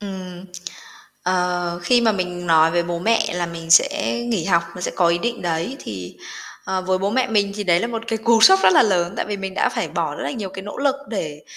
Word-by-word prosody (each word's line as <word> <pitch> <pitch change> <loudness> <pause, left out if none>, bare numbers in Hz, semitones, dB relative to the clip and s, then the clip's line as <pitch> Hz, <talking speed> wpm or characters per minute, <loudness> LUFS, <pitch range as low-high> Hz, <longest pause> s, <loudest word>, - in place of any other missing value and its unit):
Ừm, 185 -3 -8 0.8
ờ, 180 -1 -1
khi 240 +7 +3
mà 225 -2 +3
mình 180 -2 -4
nói 160 -1 +5
về 175 +1 +1
bố 170 0 -4
mẹ 225 0 +1
là 175 -1 -1
mình 165 -1 -8
sẽ 280 - +3
nghỉ 210 -9 -1
học, 170 -1 +2
mình 180 - -8
sẽ - - -1
có 180 -2 +3
ý 170 0 +2
định 240 +5 -3
đấy, 170 +8 -2
thì, 95 -4 -8 0.5
ờ, 190 -1 -2
với 185 0 0
bố 195 +2 -1
mẹ 255 +3 +1
mình 205 -3 +1
thì 205 - -4
đấy 175 -2 +3
là - - -1
một 230 -1 -5
cái 225 0 -1
cú 225 0 +3
sốc 385 +11 +7
rất - - +6
là 325 - +6
lớn, 180 -4 0
tại - - -2
vì 210 - -3
mình 195 -1 -6
đã - - +1
phải - - -3
bỏ - - -3
rất - - -6
là - - -2
nhiều 215 -7 -5
cái 190 - -8
nỗ 205 - -8
lực 275 0 +1
để 155 -8 -5
185 Hz, 255 wpm, -21 LUFS, 175-225 Hz, 0.8 s, sốc